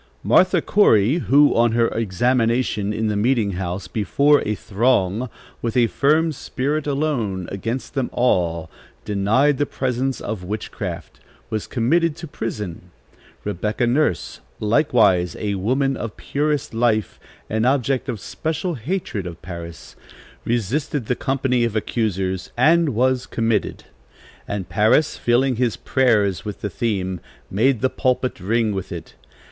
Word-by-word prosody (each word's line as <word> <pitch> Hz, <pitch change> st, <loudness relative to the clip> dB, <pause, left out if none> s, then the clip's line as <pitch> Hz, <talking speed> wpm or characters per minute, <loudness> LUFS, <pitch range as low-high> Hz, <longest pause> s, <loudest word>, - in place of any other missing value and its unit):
Martha 185 Hz, 0 st, +4 dB
Corey, 130 Hz, -, +4 dB
who, 145 Hz, -1 st, +4 dB
on 115 Hz, -1 st, +3 dB
her 115 Hz, 0 st, +3 dB
examination 115 Hz, 0 st, 0 dB
in 110 Hz, +1 st, -2 dB
the 105 Hz, -, 0 dB
meeting 110 Hz, -1 st, +1 dB
house, 90 Hz, 0 st, -4 dB
before 140 Hz, +8 st, +3 dB
a 105 Hz, -, 0 dB
throng, 110 Hz, +1 st, +1 dB, 0.3 s
with 115 Hz, 0 st, -2 dB
a 120 Hz, -, +5 dB
firm 150 Hz, +8 st, +2 dB
spirit, 145 Hz, +1 st, -2 dB
alone, 130 Hz, -, -1 dB
against 115 Hz, +6 st, -4 dB
them 135 Hz, -3 st, -1 dB
all, 85 Hz, -9 st, +1 dB, 0.4 s
denied 110 Hz, +8 st, +2 dB
the 145 Hz, -, +2 dB
presence 130 Hz, 0 st, -2 dB
of 105 Hz, -4 st, -5 dB
witchcraft, 105 Hz, +4 st, -6 dB, 0.3 s
was 110 Hz, -1 st, -2 dB
committed 160 Hz, +7 st, +1 dB
to 165 Hz, +1 st, -8 dB
prison. 105 Hz, -, -6 dB, 0.5 s
Rebecca 105 Hz, +4 st, -1 dB
Nurse, 120 Hz, -, 0 dB, 0.2 s
likewise 105 Hz, -, +3 dB
a 105 Hz, -1 st, -2 dB
woman 130 Hz, +8 st, 0 dB
of 115 Hz, -4 st, -6 dB
purest 150 Hz, -2 st, -1 dB
life, 115 Hz, -2 st, 0 dB, 0.3 s
an 110 Hz, +1 st, -1 dB
object 135 Hz, +1 st, +1 dB
of 115 Hz, -4 st, -3 dB
special 160 Hz, -, -3 dB
hatred 130 Hz, -, -3 dB
of 85 Hz, -1 st, -8 dB
Parris, 85 Hz, -2 st, -9 dB, 0.5 s
resisted 120 Hz, +4 st, -1 dB
the 125 Hz, -, 0 dB
company 130 Hz, -2 st, 0 dB
of 115 Hz, -2 st, -1 dB
accusers, 95 Hz, -4 st, -1 dB
and 160 Hz, +5 st, +4 dB
was 130 Hz, +2 st, +1 dB
committed. 115 Hz, -2 st, -1 dB, 0.6 s
And 100 Hz, -3 st, -4 dB
Parris, 105 Hz, -, +3 dB
filling 125 Hz, +1 st, +1 dB
his 120 Hz, -3 st, 0 dB
prayers 105 Hz, -, +2 dB
with 105 Hz, -2 st, -6 dB
the 105 Hz, -, -3 dB
theme, 95 Hz, -3 st, -2 dB, 0.3 s
made 120 Hz, +4 st, +2 dB
the 130 Hz, -, +2 dB
pulpit 130 Hz, -2 st, 0 dB
ring 110 Hz, +3 st, 0 dB
with 95 Hz, -1 st, -5 dB
it. 85 Hz, -3 st, -7 dB
115 Hz, 135 wpm, -21 LUFS, 100-135 Hz, 0.6 s, a